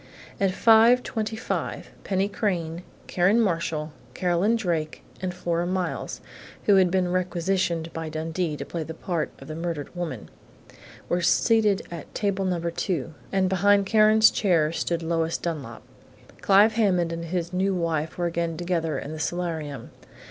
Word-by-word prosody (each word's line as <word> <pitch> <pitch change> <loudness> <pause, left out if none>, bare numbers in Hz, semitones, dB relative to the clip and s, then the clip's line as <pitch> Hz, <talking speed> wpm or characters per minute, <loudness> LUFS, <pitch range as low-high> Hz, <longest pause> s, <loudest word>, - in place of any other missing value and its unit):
At 195 - +3
5:25, 225 +1 +2 0.2
Penny 195 0 0
Crain, 175 -5 -2 0.2
Karen 185 +6 +2
Marshall, 165 -6 -1 0.2
Carolyn 180 +5 +2
Drake, 170 -8 -2 0.2
and 185 -1 -2
Flora 175 -1 -2
Miles, 185 -1 -3 0.4
who 200 -2 +5
had 185 -2 +5
been 180 -1 +1
requisitioned 175 -2 -1
by 165 -1 -4
Dundee 160 0 -2
to - - -5
play 170 - -4
the 160 +1 -6
part 170 -2 -2
of - - -12
the 155 - -5
murdered 165 -1 -4
woman, 160 -11 -5 0.8
were 175 - 0
seated 210 +3 +3
at 170 -3 -9
table 200 -2 0
No. 180 -2 0
2, 170 -2 -2 0.2
and 190 -1 +2
behind 200 +2 +3
Karen's 215 +1 +5
chair 165 -6 +2
stood 170 0 -2
Lois 165 0 0
Dunlap. 145 -9 -5 0.6
Clive 205 +3 +5
Hammond 180 -7 +2
and 165 0 -5
his 170 +1 -3
new 190 +1 +1
wife 160 -3 -2
were 175 - -1
again 170 -1 -2
together 170 -2 -1
in 145 - -6
the 155 - -6
solarium. 160 -6 -3
175 Hz, 150 wpm, -25 LUFS, 165-195 Hz, 0.8 s, who